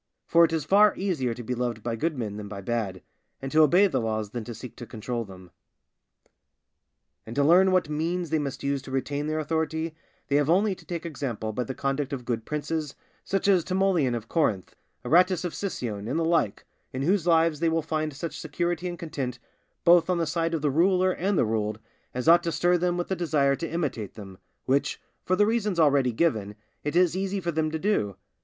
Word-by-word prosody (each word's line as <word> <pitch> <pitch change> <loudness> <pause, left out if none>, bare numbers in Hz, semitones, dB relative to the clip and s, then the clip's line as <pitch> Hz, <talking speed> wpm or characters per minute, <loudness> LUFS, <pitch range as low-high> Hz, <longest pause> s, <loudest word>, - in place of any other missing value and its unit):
For 170 0 +5
it 165 - +3
is 160 -3 -1
far 205 +5 +5
easier 150 -12 -1
to 120 - -7
be 125 - -3
loved 120 -3 -3
by 120 -1 -2
good 155 +6 -1
men 105 -4 -4
than 105 -1 -6
by 100 -1 -7
bad, 100 -3 -3 0.4
and 135 0 -6
to 155 - +5
obey 175 +6 +6
the 135 -10 0
laws 110 -2 -2
than 120 -1 -4
to 120 - -7
seek 120 +1 -9
to 120 - -8
control 115 +2 -4
them. 95 -3 -13 1.7
And 115 - -9
to 140 - +3
learn 180 +5 +5
what 185 -4 +2
means 165 +2 -2
they 160 - +2
must 140 -2 -4
use 140 0 0
to 135 - -11
retain 140 +2 -2
their 155 0 -1
authority, 160 +1 -1 0.3
they 140 - +2
have 145 0 +1
only 195 +4 +3
to - - -14
take 170 -1 -4
example 125 -9 -4
by 125 +3 -2
the 130 - -5
conduct 140 +1 -2
of 125 -3 -5
good 115 -2 -2
princes, 150 0 -3 0.3
such 195 0 -1
as 190 -4 +4
Timoleon 185 -9 +1
of 115 -1 -6
Corinth, 115 - 0 0.3
Aratus 180 +2 +3
of 175 - -3
Sicyone, 115 - -4
and 130 - -1
the 165 - +1
like, 165 -11 +1 0.3
in 130 +1 -3
whose 180 +2 +1
lives 165 -2 +3
they 165 0 +2
will 165 0 0
find 155 0 -2
such 155 +3 -6
security 175 +3 -2
and 175 -1 -5
content, 140 -7 -4 0.5
both 170 0 +5
on 180 - +2
the 170 - +1
side 165 +1 -1
of 155 - -4
the 145 - +2
ruler 185 +4 +3
and 190 +1 -1
the - - +3
ruled, 110 -1 -1 0.4
as 125 +3 -3
ought 170 +1 +7
to 170 -1 -2
stir 175 +4 +2
them 175 0 0
with 175 - -2
the 190 - 0
desire 150 -5 +2
to 165 +3 -5
imitate 145 - -3
them, 95 -3 -10 0.3
which, 135 +2 +1 0.2
for 185 - +1
the 205 - +4
reasons 215 -5 0
already 140 -5 +4
given, 110 -7 0 0.3
it 150 +2 -3
is 180 -1 +4
easy 195 +1 -1
for 170 -2 -2
them 155 -1 0
to 160 - -2
do. 155 - 0
155 Hz, 220 wpm, -26 LUFS, 125-175 Hz, 1.7 s, ought